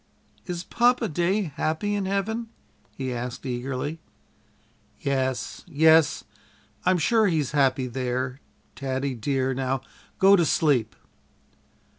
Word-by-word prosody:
"Is 175 -1 -4
Papa 240 +1 +2
day 175 +5 +1
happy 160 +7 -1
in 200 -1 -1
heaven?" 220 +4 -2 0.5
he 130 -2 -3
asked 125 +2 -5
eagerly. 130 +5 -3 1.0
"Yes, 130 -5 -2
yes, 160 -1 +4 0.6
I'm 185 0 +4
sure 220 +6 +3
he's 155 -7 0
happy 135 -2 +2
there, 125 +1 -3 0.4
Taddie 135 0 -2
dear; 130 +2 -1
now 130 0 -1 0.4
go 195 +1 +7
to 175 - +3
sleep." 140 -9 +2
140 Hz, 110 wpm, -25 LUFS, 130-180 Hz, 1.0 s, go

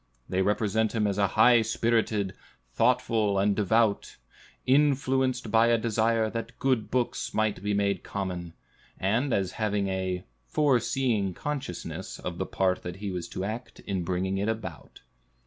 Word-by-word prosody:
They 95 - 0
represent 105 +2 +1
him 110 -2 +2
as 100 -1 0
high 115 +4 +5
spirited, 110 -3 0 0.4
thoughtful, 115 - +2
and 100 +1 +2
devout; 110 +1 +1 0.5
influenced 130 -3 +2
by 115 +1 +5
a 120 0 +4
desire 115 0 +1
that 115 +1 -5
good 130 -5 0
books 125 -1 -1
might 110 -3 0
be 105 0 0
made 100 -2 +1
common, 90 -4 -4 0.5
and 115 +9 +1
as 95 -4 0
having 105 -2 0
"a 95 -1 -2 0.2
foreseeing 120 - +1
consciousness" 95 - -5
of 85 -1 -6
the 95 - -2
part 95 -1 0
he 100 +1 -5
was 90 -2 -4
to 95 - -5
act 110 +5 -6
in 95 -3 -3
bringing 95 +2 -1
it 100 +3 0
about. 105 -8 -6
105 Hz, 145 wpm, -28 LUFS, 95-115 Hz, 0.5 s, high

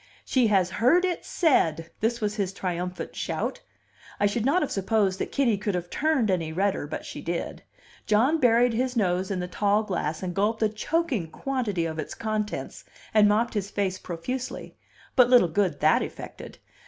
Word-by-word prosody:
"She 255 -3 +3
has 190 -4 +2
heard 295 - +3
it 360 -2 -2
said!" 165 - +1
This 235 +2 0
was 210 -1 -1
his 200 -3 -2
triumphant 180 -1 -4
shout. - - -3 0.6
I - - +3
should 220 +4 0
not 345 +5 +3
have 295 - -3
supposed 195 -1 +1
that - - -3
Kitty 235 -8 +2
could 205 -2 -1
have 175 -1 -4
turned 295 -9 +1
any 165 -4 -1
redder, 190 -3 0
but - - -6
she - - -7
did. 170 0 -4 0.5
John 250 +10 +3
buried 245 -1 +4
his 255 +2 -1
nose 185 -3 +1
in 195 -2 -2
his 180 0 -5
tall 205 +1 +2
glass, 170 -5 -3
and 180 -1 -3
gulped 215 +4 0
a 215 - +3
choking 225 - -1
quantity 215 -6 -2
of 160 -1 -4
its - - -5
contents, 215 -1 -3 0.3
and 210 -1 +6
mopped 225 +3 +1
his 200 -2 -2
face 195 -3 -2
profusely; 245 +10 -5 0.4
but 250 -2 +6
little 245 -8 +6
good 170 -4 0
that - - +4
effected. - - -8
210 Hz, 180 wpm, -26 LUFS, 180-240 Hz, 0.6 s, and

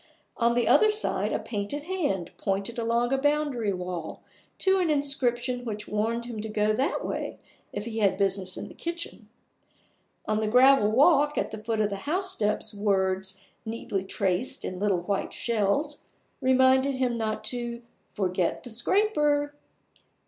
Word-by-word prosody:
On 235 0 +2
the 240 -2 +2
other 430 - +6
side 425 0 0
a - - +1
painted 210 +7 -3
hand 300 - -2
pointed 200 +4 -2
along 235 +2 +1
a 270 - +2
boundary 290 -6 +1
wall 180 -3 -5 0.3
to 385 0 +3
an 350 -3 +1
inscription 255 -4 +1
which 210 -3 -5
warned 225 +3 -1
him 230 -3 -5
to 220 - -4
go 210 0 +1
that 270 +9 0
way - - -4 0.3
if 205 +1 -5
he 225 -1 -4
had 200 -3 +2
business 190 -1 0
in - - -6
the - - -12
kitchen. 340 0 -6 1.0
On 215 0 0
the 215 - 0
gravel 250 -1 +6
walk 295 +3 +4
at - - -1
the 215 0 -7
foot 225 0 -1
of 210 -1 +1
the 200 - -2
housesteps 305 - -1
words, 190 -2 0 0.2
neatly 220 -4 -3
traced 190 +6 0
in 185 - -5
little 200 -3 +1
white 195 +2 -2
shells, 235 +7 0 0.4
reminded 260 +1 +4
him 255 -2 0
not 215 -1 -2
to 235 +1 -3 0.3
"forget 185 -3 -1
the 245 - -5
scraper". 295 - +2
235 Hz, 155 wpm, -27 LUFS, 205-275 Hz, 1.0 s, other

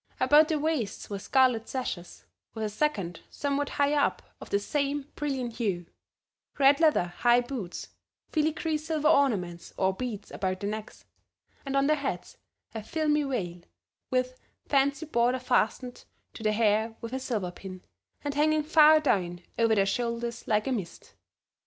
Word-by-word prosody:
About 300 +1 +6
their 315 - 0
waists 290 -11 -2
were 200 - -3
scarlet 250 -1 +2
sashes, 220 -9 -5 0.3
with 220 - -3
a 215 - -1
second 205 - -1
somewhat 285 0 -2
higher 285 +1 +2
up 285 - 0 0.2
of - - -9
the - - +2
same 280 +6 -2
brilliant 260 -5 -3
hue; 195 -7 -1 0.7
red 280 +1 +5
leather 315 - +4 0.2
high 240 0 +5
boots, 240 -8 -6 0.4
filigree 315 0 0
silver 310 -1 -1
ornaments 195 - +1
or 190 0 +2
beads 210 -1 -5
about 185 -1 -2
their 200 +1 -2
necks, 215 0 -8 0.6
and 275 0 0
on 275 - +3
their 305 +1 +3
heads 280 -1 -5 0.3
a 220 - -4
filmy 300 +6 0
veil 195 -12 -3 0.5
with 255 0 0 0.3
fancy 280 +1 +2
border 245 -3 +2
fastened 250 0 0 0.3
to - - -10
the 215 -1 +2
hair 220 +1 +1
with 230 +1 -7
a 260 - -1
silver 220 -9 -2
pin, 185 0 -10 0.4
and 290 -1 -2
hanging 305 +1 +2
far 310 0 +6
down 180 - 0 0.2
over 230 -1 +4
their 195 -2 +3
shoulders 235 +2 -2
like 210 -1 +2
a 270 - -1
mist. 200 -9 -5
250 Hz, 160 wpm, -28 LUFS, 210-290 Hz, 0.7 s, About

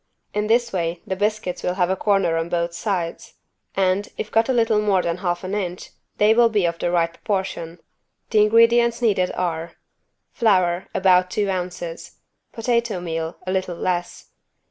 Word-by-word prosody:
In 210 0 -1
this 235 +1 +2
way 170 -2 -1
the 190 - -2
biscuits 205 -2 -2
will 180 - -1
have 180 -1 +1
a - - +1
corner 195 -4 +1
on 165 +1 -2
both 170 0 -1
sides 175 -2 -3 0.4
and, 190 +1 +1
if 215 - -5
cut 225 +3 +2
a - - +4
little 225 -3 +2
more 200 -3 +2
than 170 0 -1
half 175 -1 -2
an 185 +2 -4
inch, 185 -3 -4 0.3
they 210 +1 +5
will 235 0 +5
be 210 -5 +1
of 170 0 -1
the - - 0
right 170 -1 +1
proportion. 180 -5 -3 0.5
The 215 -2 +5
ingredients 230 +2 +4
needed 195 -5 +2
are: 170 -2 -3 0.6
Flour, 185 -5 +2
about 185 -1 +4
two 200 +1 0
ounces. 175 -2 -5 0.3
Potato 235 -3 -1
meal, 165 -1 -4
a 185 - -2
little 185 -2 -1
less. 175 -1 -3
185 Hz, 170 wpm, -22 LUFS, 175-210 Hz, 0.6 s, they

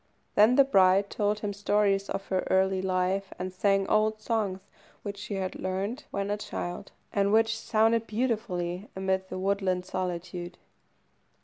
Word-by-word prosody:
Then 215 +4 +6
the 275 - +7
bride 195 -5 +4
told 210 0 0
him 205 -1 -2
stories 200 -1 +1
of 195 0 -3
her 185 - +1
early 190 0 +2
life, 185 +1 0
and 185 0 -4
sang 195 +1 +2
old 215 0 +2
songs 215 -4 -1 0.4
which 200 -1 -5
she 205 0 -5
had 190 -1 -2
learned 195 +9 -3
when 200 0 -2
a 205 - 0
child, 175 -3 -5 0.2
and 200 0 +2
which 225 +1 +3
sounded 225 +1 +2
beautifully 210 -5 -2
amid 190 0 -1
the - - -5
woodland 190 -1 0
solitude. 180 -1 -4
195 Hz, 150 wpm, -28 LUFS, 185-210 Hz, 0.4 s, the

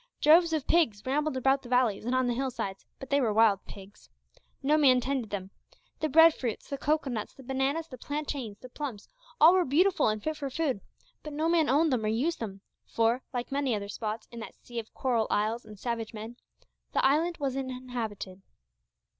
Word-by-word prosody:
Droves 330 +2 +6
of 310 -3 -1
pigs 285 -12 +2
rambled 290 +1 0
about 270 +1 +2
the 245 - -12
valleys 245 -5 +2
and 245 +2 0
on 255 0 +2
the 245 - +1
hill 265 +2 -1
sides, 195 -5 -5
but 270 - -10
they 280 0 +3
were 230 -4 +2
wild 210 -2 +4
pigs. 200 +1 -13 0.5
No 295 +3 +3
man 270 -5 +5
tended 255 -3 -2
them. 195 -1 -5 0.5
The 310 - 0
bread 325 +3 +7
fruits, 240 -7 -4
the 280 - -2
cocoanuts, 275 -8 -1
the 270 - -13
bananas, 270 +5 -1
the 255 -5 -11
plantains, 280 -8 -4
the 255 - -12
plums, 245 -6 -6 0.3
all 325 +3 +8
were 370 -1 +4
beautiful 350 +7 +3
and 215 0 0
fit 310 -1 -2
for 280 -2 -4
food, 270 -6 -1 0.4
but 300 - -8
no 310 +2 0
man 330 -3 +3
owned 300 +2 +3
them 235 -3 0
or - - 0
used 255 +11 0
them, 200 -4 -6 0.3
for, 230 +3 +1
like 245 0 -4
many 275 -4 0
other 200 -1 -5
spots 215 +1 -4
in 235 - -8
that 225 - -8
sea 240 -1 -7
of 225 - -9
coral 235 -4 +1
isles 220 +3 0
and 215 -1 -12
savage 230 0 -4
men, 220 +3 -7 0.6
the - - +2
island 320 +5 +2
was 275 -3 -2
uninhabited. 245 -7 -5
255 Hz, 205 wpm, -29 LUFS, 225-295 Hz, 0.6 s, all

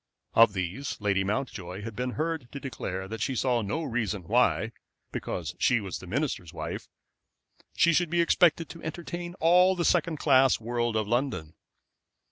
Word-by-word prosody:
Of 115 -2 +6
these 95 +9 -3
Lady 100 -2 +1
Mountjoy 100 -3 -3
had 115 -1 -6
been 125 +1 -2
heard 160 -5 -3
to 140 - -5
declare 95 -8 -5
that 110 +2 -6
she 135 - -1
saw 125 -1 +1
no 110 +11 -2
reason 110 - -2
why, 115 +3 +2 0.4
because - - -4
she 120 - +3
was 95 -4 -5
the 95 - -11
minister's 110 - -2
wife, - - -5 0.9
she 170 - +4
should 175 0 +2
be 175 +1 +1
expected 170 -1 +4
to 165 - -10
entertain 175 +2 -5
all 180 +2 +5
the 170 -2 -1
second 165 -2 +2
class 135 -3 +4
world 120 0 -1
of 110 -2 0
London. 120 - -1
125 Hz, 165 wpm, -28 LUFS, 105-160 Hz, 0.9 s, Of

